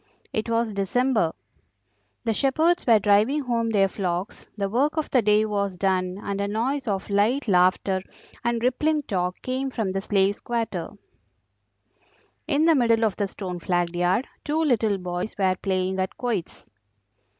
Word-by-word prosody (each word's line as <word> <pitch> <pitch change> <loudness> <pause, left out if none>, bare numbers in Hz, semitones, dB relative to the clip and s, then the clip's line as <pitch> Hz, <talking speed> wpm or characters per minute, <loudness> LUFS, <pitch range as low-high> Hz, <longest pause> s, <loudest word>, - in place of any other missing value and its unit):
It 220 +1 -2
was 230 -1 0
December. 215 -1 +1 0.9
The 225 -2 0
shepherds 315 +8 +1
were 230 -2 +7
driving 210 +8 +3
home 230 -2 0
their 200 -3 +3
flocks, 185 -1 -4
the 200 -1 0
work 275 +10 0
of 310 - -2
the 255 - +4
day 210 0 +3
was 200 -3 -2
done, 185 0 0
and 200 0 -3
a 200 - 0
noise 245 +6 -1
of 195 -2 -2
light 220 +8 +2
laughter 185 0 +3 0.4
and 235 -1 0
rippling 300 +5 +1
talk 180 -6 -2
came 260 +1 -2
from 220 -7 -2
the 195 0 -2
Slaves' 200 0 +1
quarter. 235 -1 -3 1.6
In 300 +1 +2
the 330 - +6
middle 230 -5 +3
of 215 - 0
the 205 - -1
stone 185 -2 -6
flagged 175 0 -1
yard 180 +8 +1 0.2
two 305 +2 -1
little 225 -8 +2
boys 180 +2 -4
were 190 -2 +2
playing 190 0 -1
at 185 0 -2
quoits. 225 -9 -4
210 Hz, 160 wpm, -24 LUFS, 190-245 Hz, 1.6 s, were